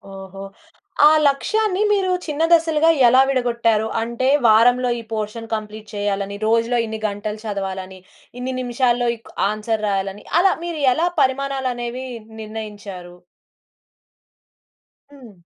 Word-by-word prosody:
ఓహో! 195 Hz, 0 st, -9 dB, 0.6 s
ఆ -, -, +8 dB, 0.2 s
లక్ష్యాన్ని 415 Hz, +8 st, 0 dB
మీరు 385 Hz, -3 st, +1 dB
చిన్న 305 Hz, +1 st, -2 dB
దశలుగా 325 Hz, -1 st, +3 dB, 0.2 s
ఎలా 255 Hz, +2 st, +6 dB
విడగొట్టారు? 235 Hz, -4 st, +1 dB
అంటే 235 Hz, +3 st, -2 dB, 0.2 s
వారంలో 245 Hz, +3 st, +4 dB
ఈ -, -, -6 dB
పోర్షన్ 220 Hz, +1 st, -4 dB
కంప్లీట్ 215 Hz, 0 st, -8 dB
చేయాలని, 200 Hz, 0 st, -2 dB
రోజులో 230 Hz, +2 st, +2 dB
ఇన్ని 220 Hz, 0 st, -5 dB
గంటలు 210 Hz, +1 st, -5 dB
చదవాలని, 190 Hz, -2 st, -5 dB, 0.4 s
ఇన్ని 260 Hz, +1 st, -3 dB
నిమిషాల్లో 245 Hz, 0 st, +1 dB
ఇక్ 225 Hz, -, -18 dB, 0.2 s
ఆన్సర్ 215 Hz, 0 st, -3 dB
రాయాలని. 195 Hz, 0 st, -2 dB, 0.2 s
అలా 380 Hz, +1 st, +4 dB
మీరెలా 315 Hz, -2 st, +1 dB
పరిమాణాలు 270 Hz, 0 st, 0 dB
అనేవి 240 Hz, +2 st, -5 dB, 0.4 s
నిర్ణయించారు? 210 Hz, -5 st, -8 dB, 2.0 s
హ్మ్. 235 Hz, -10 st, -15 dB
230 Hz, 110 wpm, -20 LUFS, 210-260 Hz, 2.0 s, ఆ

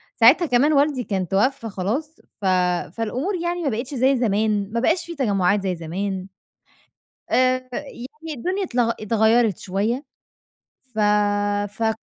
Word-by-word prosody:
ساعتها 260 Hz, +10 st, +6 dB
كمان 285 Hz, +2 st, +3 dB
والدي 285 Hz, -3 st, +2 dB
كان 190 Hz, -5 st, -2 dB
توفى 225 Hz, -, 0 dB
خلاص 230 Hz, +12 st, -3 dB, 0.3 s
ف -, -, -4 dB, 0.5 s
فالأمور 255 Hz, -, -2 dB
يعني 345 Hz, 0 st, -2 dB
ما 285 Hz, -, +1 dB
بقيتش 245 Hz, +4 st, -4 dB
زي 265 Hz, +1 st, +3 dB
زمان 210 Hz, -3 st, 0 dB
ما 235 Hz, -, 0 dB
بقاش 330 Hz, +9 st, +1 dB
في 340 Hz, -, -7 dB
تجمعات 200 Hz, -, +1 dB
زي 185 Hz, -2 st, -1 dB
زمان. 185 Hz, +3 st, -4 dB, 1.0 s
آآ 255 Hz, 0 st, +2 dB
فيعني 250 Hz, -1 st, -7 dB, 0.3 s
الدنيا 375 Hz, +10 st, -2 dB
اتلغ 240 Hz, -7 st, +1 dB
اتغيّرت 220 Hz, -1 st, +2 dB
شوية 210 Hz, +8 st, -2 dB, 0.9 s
ف 215 Hz, -, -4 dB, 0.7 s
فك 220 Hz, +1 st, -1 dB
235 Hz, 135 wpm, -22 LUFS, 205-275 Hz, 1.0 s, ساعتها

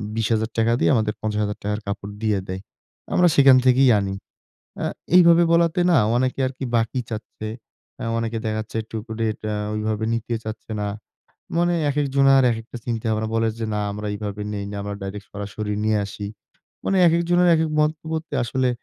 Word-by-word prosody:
বিশ 115 Hz, -1 st, 0 dB
হাজার 110 Hz, 0 st, 0 dB
টাকা 115 Hz, +1 st, +3 dB
দেই, -, -, +3 dB
আমাদের 110 Hz, -2 st, +1 dB
৳৫০,০০০ 105 Hz, -1 st, -2 dB
-র -, -, -9 dB
কাপড় 100 Hz, 0 st, -4 dB
দিয়ে 105 Hz, -3 st, +2 dB
দেয়। 95 Hz, +1 st, -5 dB, 0.5 s
আমরা 180 Hz, -, +5 dB
সেখান 135 Hz, -2 st, +7 dB
থেকেই 130 Hz, +1 st, +5 dB
আনি।" 100 Hz, -1 st, -2 dB, 0.7 s
আ -, -, +1 dB, 0.3 s
এইভাবে 170 Hz, -1 st, +7 dB
বলাতে 170 Hz, +1 st, +3 dB
না 175 Hz, -, +5 dB, 0.2 s
অনেকে 130 Hz, +2 st, 0 dB
আরকি 130 Hz, +1 st, -5 dB
বাকি 115 Hz, +2 st, 0 dB
চাচ্ছে। 110 Hz, -1 st, -6 dB, 0.5 s
আ -, -, -3 dB
অনেকে 115 Hz, 0 st, -2 dB
দেখা 110 Hz, 0 st, -1 dB
যাচ্ছে 110 Hz, +1 st, -7 dB
একটুকু 110 Hz, +1 st, -8 dB
রেট 110 Hz, -1 st, -1 dB
আ -, -, -2 dB, 0.2 s
ঐভাবে 110 Hz, 0 st, -1 dB
নিতে 115 Hz, +1 st, -2 dB
চাচ্ছে 110 Hz, +1 st, -7 dB
না। 105 Hz, -, -1 dB, 0.7 s
মানে 175 Hz, +1 st, +2 dB, 0.2 s
একেকজনার 135 Hz, -1 st, +4 dB
একেকটা 115 Hz, +2 st, -6 dB
চিন্তা-ভাবনা 110 Hz, -2 st, -1 dB
বলে 115 Hz, 0 st, +2 dB
যে, 115 Hz, -, -1 dB
"না 105 Hz, -, -1 dB
আমরা 105 Hz, +1 st, -5 dB
এইভাবে 105 Hz, 0 st, -5 dB
নেই 100 Hz, -1 st, -3 dB
না, -, -, -6 dB
আমরা 100 Hz, 0 st, -4 dB
ডাইরেক্ট 100 Hz, +1 st, -6 dB
সরাসরি 105 Hz, +1 st, -4 dB
নিয়ে 110 Hz, 0 st, +2 dB
আসি।" 100 Hz, 0 st, -6 dB, 0.6 s
মানে 195 Hz, -, +2 dB
একেকজনের 175 Hz, +2 st, +3 dB
একেক 160 Hz, 0 st, +1 dB
মন্তব্যতে 160 Hz, +1 st, -2 dB
আসলে 130 Hz, +2 st, 0 dB
115 Hz, 170 wpm, -23 LUFS, 105-135 Hz, 0.7 s, সেখান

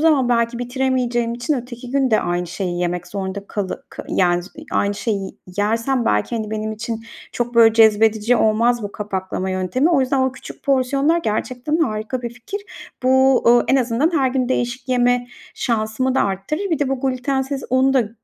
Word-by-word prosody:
zaman 300 Hz, -6 st, +3 dB
belki 235 Hz, -1 st, +1 dB
bitiremeyeceğim 245 Hz, -2 st, 0 dB
için 245 Hz, +6 st, -1 dB
öteki 245 Hz, -1 st, -7 dB
gün 270 Hz, -2 st, +1 dB
de 215 Hz, -, +4 dB
aynı 175 Hz, 0 st, -1 dB
şeyi 175 Hz, 0 st, -3 dB
yemek 175 Hz, 0 st, -2 dB
zorunda 195 Hz, +1 st, -5 dB
kalı 200 Hz, -3 st, -4 dB
k -, -, -9 dB
yani, 175 Hz, -1 st, +2 dB
z -, -, -11 dB
iii, 305 Hz, +1 st, -10 dB
aynı 200 Hz, 0 st, +1 dB
şeyi 200 Hz, -3 st, -2 dB, 0.3 s
yersem 230 Hz, +5 st, +1 dB
belki, 105 Hz, -, +1 dB
hani, 215 Hz, -1 st, -4 dB
benim 215 Hz, 0 st, -3 dB
için 225 Hz, +1 st, -5 dB, 0.3 s
çok, 240 Hz, 0 st, -3 dB
böyle, 225 Hz, -1 st, +6 dB
cezbedici 220 Hz, +1 st, +4 dB
olmaz 230 Hz, +2 st, +2 dB
bu 205 Hz, -1 st, -5 dB
kapaklama 190 Hz, -2 st, -3 dB
yöntemi. 185 Hz, -, +1 dB
O 320 Hz, -6 st, +4 dB
yüzden 265 Hz, +1 st, +1 dB
o 260 Hz, -1 st, +1 dB
küçük 265 Hz, -, -11 dB
porsiyonlar 275 Hz, +4 st, +2 dB
gerçekten 255 Hz, +2 st, -2 dB
harika 230 Hz, -3 st, -1 dB
bir 235 Hz, -, -3 dB
fikir. 250 Hz, -, -7 dB, 0.4 s
Bu, 260 Hz, 0 st, +4 dB
ııı, 240 Hz, 0 st, +6 dB
en 265 Hz, -, +4 dB
azından 255 Hz, +5 st, +1 dB
her 265 Hz, -1 st, +2 dB
gün 255 Hz, -1 st, 0 dB
değişik 255 Hz, +1 st, -2 dB
yeme 245 Hz, -1 st, +2 dB, 0.3 s
şansımı 230 Hz, +3 st, -1 dB
da -, -, +3 dB
arttırır. 200 Hz, -, -2 dB
Bir 325 Hz, -, +1 dB
de 290 Hz, -, 0 dB
bu 270 Hz, -1 st, -2 dB
glütensiz 265 Hz, +1 st, -1 dB
un 260 Hz, +1 st, +3 dB
da, 245 Hz, -5 st, +2 dB
240 Hz, 185 wpm, -20 LUFS, 215-265 Hz, 0.4 s, böyle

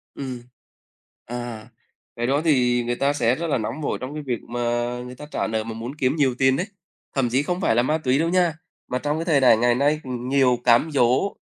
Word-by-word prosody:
Ừm. 130 Hz, -3 st, -6 dB, 0.8 s
À, 120 Hz, -2 st, -6 dB, 0.5 s
cái 120 Hz, 0 st, -1 dB
đó 140 Hz, +3 st, +2 dB
thì 125 Hz, -5 st, +3 dB
người 120 Hz, +1 st, -1 dB
ta 140 Hz, +2 st, +1 dB
sẽ 125 Hz, -3 st, +2 dB
rất 170 Hz, +1 st, -3 dB
là 145 Hz, -, +1 dB
nóng 115 Hz, +7 st, -4 dB
vội -, -, -1 dB
trong 130 Hz, +3 st, -5 dB
cái 150 Hz, -1 st, -5 dB
việc 125 Hz, -4 st, -3 dB
mà 120 Hz, +1 st, -6 dB, 0.5 s
người 125 Hz, 0 st, -9 dB
ta 150 Hz, -, -9 dB
trả -, -, -1 dB
nợ 110 Hz, 0 st, -1 dB
mà 115 Hz, 0 st, -6 dB
muốn 120 Hz, +5 st, -6 dB
kiếm 130 Hz, -1 st, +1 dB
nhiều 135 Hz, -5 st, +2 dB
tiền 130 Hz, 0 st, +4 dB
đấy, 180 Hz, +8 st, -2 dB, 0.5 s
thậm 135 Hz, -3 st, +1 dB
chí 130 Hz, +4 st, +1 dB
không 180 Hz, +4 st, -2 dB
phải 115 Hz, -, +2 dB
là 120 Hz, -, +3 dB
ma 155 Hz, +4 st, +1 dB
túy 135 Hz, -2 st, +1 dB
đâu 165 Hz, -, +1 dB
nha, 175 Hz, -3 st, +2 dB, 0.3 s
mà 125 Hz, -, -2 dB
trong 150 Hz, +1 st, -1 dB
cái 165 Hz, -, -3 dB
thời 160 Hz, -5 st, +3 dB
đại 120 Hz, -4 st, +6 dB
ngày 120 Hz, +1 st, +3 dB
nay 145 Hz, +4 st, +1 dB
nhiều 125 Hz, 0 st, +1 dB
cám 120 Hz, +6 st, +4 dB
dỗ, 130 Hz, +7 st, +2 dB
130 Hz, 235 wpm, -23 LUFS, 120-150 Hz, 0.8 s, đại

